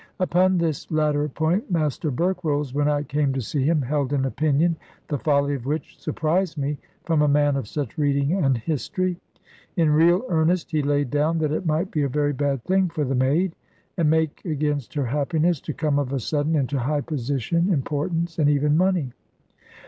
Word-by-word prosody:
Upon 185 0 +3
this 165 -4 -2
latter 150 -1 +1
point 160 - -1
Master 155 -3 0
Berkrolles, 150 -3 -1
when 145 +1 +1
I 145 -1 +1
came 145 -1 0
to 135 - -2
see 135 +4 -2
him, 155 0 +2
held 140 +1 -1
an 135 -2 +1
opinion, 155 +4 +1 0.3
the 145 - -1
folly 140 0 +2
of 135 -2 -5
which 155 +3 -4
surprised 160 +3 -1
me, 140 0 -2 0.3
from 165 -3 +2
a 150 - +4
man 145 0 +3
of 135 -6 -3
such 145 +4 -4
reading 140 +1 +1
and 140 -10 +2
history. 170 +8 -2 0.6
In 160 -3 +3
real 170 +8 +4
earnest 165 0 +1
he 155 -2 +1
laid 145 -2 0
down 150 +3 +1
that 155 -2 0
it 165 +3 -2
might 160 +4 0
be 150 - 0
a 140 - +1
very 145 +2 0
bad 140 -2 -1
thing 190 -1 +2
for 160 -3 -2
the 135 - -1
maid, 145 +8 +1 0.4
and 165 -3 +2
make 160 -1 0
against 150 -5 -2
her 145 -3 0
happiness, 150 +5 0
to - - -5
come 150 -2 0
of 135 -2 -2
a 135 - -1
sudden 150 +6 0
into 140 -1 0
high 145 +4 0
position, 145 - -1
importance, 165 +3 -1
and 145 -2 +4
even 145 +1 +2
money. 175 -7 +1
150 Hz, 190 wpm, -23 LUFS, 140-165 Hz, 0.6 s, a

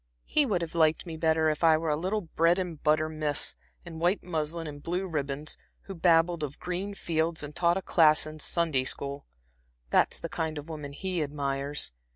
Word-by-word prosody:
"He 295 -2 +3
would 180 -6 0
have 165 - -6
liked 160 0 +3
me 165 -2 -6
better 160 0 +2
if 155 - -4
I 160 -1 +6
were 160 -1 -1
a - - +2
little 190 +7 -1
bread 165 0 +2
and 175 -5 -4
butter 155 +1 +3
miss, 155 -2 0 0.3
in 165 -2 -8
white 175 +4 +1
muslin 165 -1 -2
and 145 -2 -7
blue 180 +5 -2
ribbons, 145 -3 -3 0.2
who 195 - -8
babbled 170 -1 +3
of 145 -2 -4
green 190 +3 -4
fields 160 -2 -1
and 145 0 -8
taught 170 0 +3
a 190 - -4
class 155 -3 +5
in 155 0 -8
Sunday 160 -5 +1
school. 140 +1 -4 0.6
That's - - +4
the - - -5
kind 160 -1 -3
of 145 +2 -7
woman 150 -3 -6
he 185 +2 -2
admires. 140 - -2
160 Hz, 195 wpm, -28 LUFS, 150-170 Hz, 0.6 s, I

